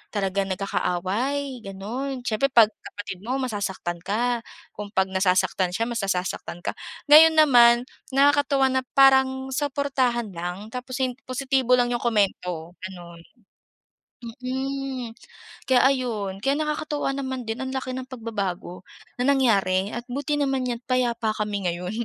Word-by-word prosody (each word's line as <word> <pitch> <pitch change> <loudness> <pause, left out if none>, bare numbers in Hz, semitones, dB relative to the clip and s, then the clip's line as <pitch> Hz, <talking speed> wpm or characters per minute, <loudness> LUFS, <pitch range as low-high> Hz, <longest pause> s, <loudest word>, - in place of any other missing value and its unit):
Talagang 195 -1 0
nagkakaaway, 205 +8 -2
gano'n. 235 +7 -5
Siyempre, 240 +3 +1
'pag 230 -5 +5
kapatid 205 -4 -9
mo, 235 +7 -3
masasaktan 200 -7 -3
ka. 235 +7 -1 0.3
Kung 210 - -7
'pag 190 0 +1
nasasaktan 185 -1 +1
siya, 225 - 0
mas 235 -1 -2
nasasaktan 180 -2 -3
ka. - - -1 0.4
Ngayon 320 +1 +9
naman, 240 -6 +6 0.3
nakakatuwa 280 -1 +4
na 260 0 +1
parang 265 -1 +4
suportahan 265 -5 0
lang 180 +5 -6
tapos 255 +2 -4
im 255 - 0 0.2
positibo 260 -1 +2
lang 245 -1 +1
'yong 240 - 0
komento, 180 -7 0
gano'n. 175 -2 -9 1.2
Mm, 265 -2 -4 0.6
kaya 255 - +6
ayun. 220 -8 -2
Kaya 275 +3 +2
nakakatuwa 300 -2 -2
naman 260 -2 -4
din 225 +1 -3
ang 260 - -4
laki 260 -1 -3
ng 260 0 -5
pagbabago 200 -7 -4 0.4
na 245 - 0
nangyari 200 -8 +2
at 235 - -4
buti 290 +3 -1
naman 270 -2 0
niyan 240 -1 -3
payapa 240 -3 +1
kami 205 -2 -2
ngayon. 180 +1 -5
240 Hz, 135 wpm, -24 LUFS, 195-265 Hz, 1.2 s, Ngayon